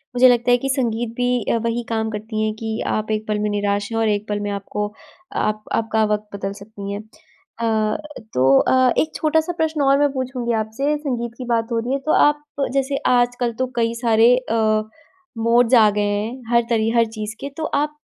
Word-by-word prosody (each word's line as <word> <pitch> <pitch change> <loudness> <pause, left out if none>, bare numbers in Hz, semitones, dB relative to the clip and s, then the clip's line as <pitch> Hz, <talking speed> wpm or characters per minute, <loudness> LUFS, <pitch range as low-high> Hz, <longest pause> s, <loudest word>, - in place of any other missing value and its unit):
मुझे 250 +1 +7
लगता 245 0 +3
है 245 - +6
कि 270 +2 -3
संगीत 240 -4 0
भी 245 -1 +1
अ, - - +2
वही 230 +1 -1
काम 220 -1 -1
करती 215 +1 -4
हैं 215 0 0
कि 220 0 -3
आप 215 0 -1
एक 215 0 -2
पल 210 -1 -1
में 210 0 0
निराश 205 0 -1
हैं 225 - -1
और 225 - +2
एक 205 0 -1
पल 205 0 -1
में 205 0 -3
आपको 205 +1 -4 0.5
आप 215 0 -1
आपका 220 -1 +1
वक़्त 210 0 -3
बदल 195 0 -4
सकती 200 -1 -8
है। 200 - -4
अ, 220 -4 -3 0.4
तो 130 +1 +3
अ, 255 -1 +3
एक 315 - +1
छोटा-सा 320 +2 +1
प्रश्न 320 -1 0
और 275 0 +4
मैं 290 - +3
पूछूँगी 255 -2 -2
आपसे, 275 +8 -1
संगीत 245 -6 -3
की 255 - -6
बात 230 0 0
हो 230 - +1
रही 240 +3 -2
है 275 - 0
तो 310 - +2
आप 295 0 +1 0.3
जैसे 275 0 0 0.2
आजकल 245 0 +1
तो 255 - +1
कई 230 -1 +1
सारे 230 +1 +5
अ, 220 -3 +1 0.6
मोड्स 235 +2 +3
आ 220 -3 +7
गए 210 - +1
हैं, 215 +5 -3
हर 235 - +6
तरी 225 -2 +2
हर 230 - +5
चीज़ 220 -1 -6
के 280 - -5
तो 320 - -3 0.2
आप 300 0 -5
230 Hz, 210 wpm, -21 LUFS, 215-255 Hz, 0.6 s, मुझे